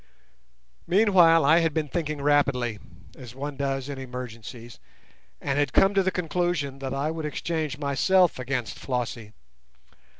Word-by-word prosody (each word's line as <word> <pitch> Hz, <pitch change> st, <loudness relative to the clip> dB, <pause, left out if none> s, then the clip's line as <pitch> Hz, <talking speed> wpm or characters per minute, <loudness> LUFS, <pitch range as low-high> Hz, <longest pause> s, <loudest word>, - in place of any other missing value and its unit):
Meanwhile 175 Hz, -6 st, +5 dB
I 160 Hz, +4 st, +6 dB
had 165 Hz, -3 st, 0 dB
been 155 Hz, -2 st, 0 dB
thinking 150 Hz, -1 st, -3 dB
rapidly, 135 Hz, -6 st, +1 dB, 0.4 s
as 125 Hz, -2 st, -11 dB
one 145 Hz, +1 st, -5 dB
does 135 Hz, -1 st, -2 dB
in 140 Hz, -2 st, -6 dB
emergencies, 120 Hz, -2 st, -8 dB, 0.6 s
and 140 Hz, +1 st, -1 dB
had 145 Hz, -, 0 dB
come 195 Hz, +1 st, +5 dB
to 195 Hz, -, +3 dB
the 190 Hz, -, +1 dB
conclusion 175 Hz, -5 st, -2 dB
that 135 Hz, -1 st, -4 dB
I 140 Hz, +3 st, -1 dB
would 160 Hz, -1 st, -5 dB
exchange 155 Hz, 0 st, -3 dB
myself 150 Hz, +5 st, +2 dB
against 130 Hz, -3 st, -3 dB
Flossie. 120 Hz, -4 st, -4 dB
145 Hz, 140 wpm, -26 LUFS, 130-165 Hz, 0.6 s, I